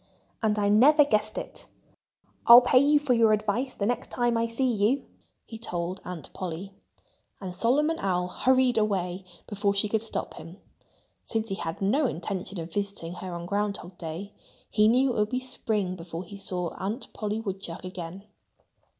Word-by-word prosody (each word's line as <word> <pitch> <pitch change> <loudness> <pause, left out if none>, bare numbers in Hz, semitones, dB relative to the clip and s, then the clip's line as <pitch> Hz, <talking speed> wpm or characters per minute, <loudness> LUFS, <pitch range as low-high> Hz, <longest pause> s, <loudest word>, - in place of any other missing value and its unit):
And 215 -2 +1
I 205 -1 +2
never 280 +9 +6
guessed 215 -4 +1
it.... - - -6 0.8
I'll 235 +1 +11
pay 255 +1 +5
you 290 +2 +5
for 290 -3 +1
your 225 -2 +5
advice 215 +5 -1
the 200 - -2
next 245 +2 -1
time 240 -1 +1
I 230 0 +1
see 230 +3 -1
you," 220 +6 +1 0.4
he 225 - -9
told 180 -3 -4
Aunt 180 -3 -7
Polly. 185 +2 -5 0.7
And 185 -3 -6
Solomon 295 - +1
Owl 180 -2 0
hurried 255 +4 +3
away 190 -3 -1 0.2
before 200 -1 -1
she 200 +2 +1
could 220 +1 0
stop 225 - -4
him. 165 +3 -10 0.7
Since 225 -1 -2
he 195 - -1
had 165 +1 -4
no 265 +9 +3
intention 185 0 -4
of 165 0 -7
visiting 200 -4 -3
her 185 0 -7
on 170 0 -5
ground 205 +2 -1
hog 175 +2 -11
day, 170 +5 -6 0.4
he 210 0 +4
knew 255 +3 +4
it 230 - -2
would 210 0 +2
be 255 - -1
spring 215 -7 -2
before 165 0 -7
he 190 +3 -11
saw 180 -3 -3
Aunt 210 +7 -4
Polly 210 0 -2
Woodchuck 195 -5 -5
again. 185 0 -7
205 Hz, 175 wpm, -27 LUFS, 185-230 Hz, 0.8 s, I'll